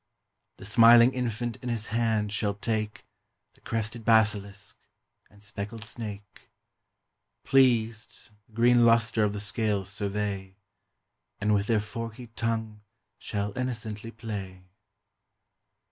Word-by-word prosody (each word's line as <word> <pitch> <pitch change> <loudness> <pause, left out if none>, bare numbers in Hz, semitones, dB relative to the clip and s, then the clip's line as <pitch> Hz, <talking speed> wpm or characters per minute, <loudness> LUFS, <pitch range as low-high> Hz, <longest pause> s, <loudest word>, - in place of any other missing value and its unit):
The - - -10
smiling 115 +3 +7
infant 120 -2 -2
in 125 - -6
his 115 -2 -2
hand 110 -3 +1
shall 100 -1 -1
take 110 0 -3 0.5
The - - -23
crested 115 +1 -3
basilisk 105 -2 +1 0.5
and 105 +1 -20
speckled 105 +2 -6
snake, 105 -3 -9 0.9
Pleased, 115 -4 +2 0.2
the - - -28
green 120 +1 +4
lustre 115 -1 +4
of 105 -1 +1
the 105 - -4
scales 105 -2 -1
survey, 100 -2 -3 0.8
And 105 +1 +2
with 100 0 +1
their 115 -2 +3
forky 115 +3 -6
tongue 110 -2 -2 0.4
shall 100 0 -3
innocently 115 -4 -4
play. 100 -5 -7
110 Hz, 115 wpm, -27 LUFS, 105-115 Hz, 0.9 s, smiling